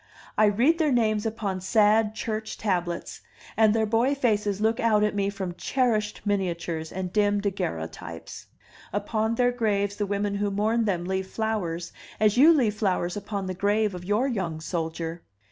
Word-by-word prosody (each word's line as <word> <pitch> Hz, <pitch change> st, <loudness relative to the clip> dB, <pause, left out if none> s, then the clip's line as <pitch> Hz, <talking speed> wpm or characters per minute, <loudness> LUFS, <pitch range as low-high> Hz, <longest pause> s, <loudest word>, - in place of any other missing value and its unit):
I 215 Hz, -, +5 dB
read 245 Hz, -, +3 dB
their 310 Hz, -3 st, +2 dB
names 220 Hz, -3 st, +2 dB
upon 205 Hz, -4 st, -3 dB
sad 215 Hz, +2 st, +3 dB
church 220 Hz, -1 st, -4 dB
tablets, 175 Hz, -4 st, -2 dB, 0.3 s
and 220 Hz, -1 st, +5 dB
their 220 Hz, -1 st, +2 dB
boy 235 Hz, +6 st, +2 dB
faces 210 Hz, -6 st, 0 dB
look 220 Hz, +1 st, +1 dB
out 215 Hz, -2 st, +3 dB
at 210 Hz, -, +1 dB
me 200 Hz, -1 st, 0 dB
from 190 Hz, -3 st, -4 dB
cherished 215 Hz, 0 st, 0 dB
miniatures 170 Hz, -5 st, -2 dB
and 185 Hz, -1 st, -4 dB
dim 205 Hz, -1 st, +2 dB
daguerreotypes. 85 Hz, -, -5 dB, 0.4 s
Upon 215 Hz, +2 st, -1 dB
their 245 Hz, +1 st, +3 dB
graves 205 Hz, -4 st, 0 dB
the 205 Hz, -, -1 dB
women 200 Hz, 0 st, -1 dB
who 205 Hz, 0 st, 0 dB
mourn 220 Hz, +3 st, +1 dB
them 180 Hz, -4 st, -1 dB
leave 190 Hz, 0 st, -2 dB
flowers 190 Hz, -6 st, -3 dB, 0.3 s
as 215 Hz, -1 st, +3 dB
you 290 Hz, +7 st, +7 dB
leave 250 Hz, -10 st, +3 dB
flowers 185 Hz, -4 st, -1 dB
upon 205 Hz, -1 st, -4 dB
the 185 Hz, -, -3 dB
grave 205 Hz, +2 st, +1 dB
of 180 Hz, -1 st, -7 dB
your 210 Hz, +8 st, +1 dB
young 185 Hz, -10 st, -2 dB
soldier. 165 Hz, 0 st, -4 dB
205 Hz, 165 wpm, -26 LUFS, 190-220 Hz, 0.4 s, you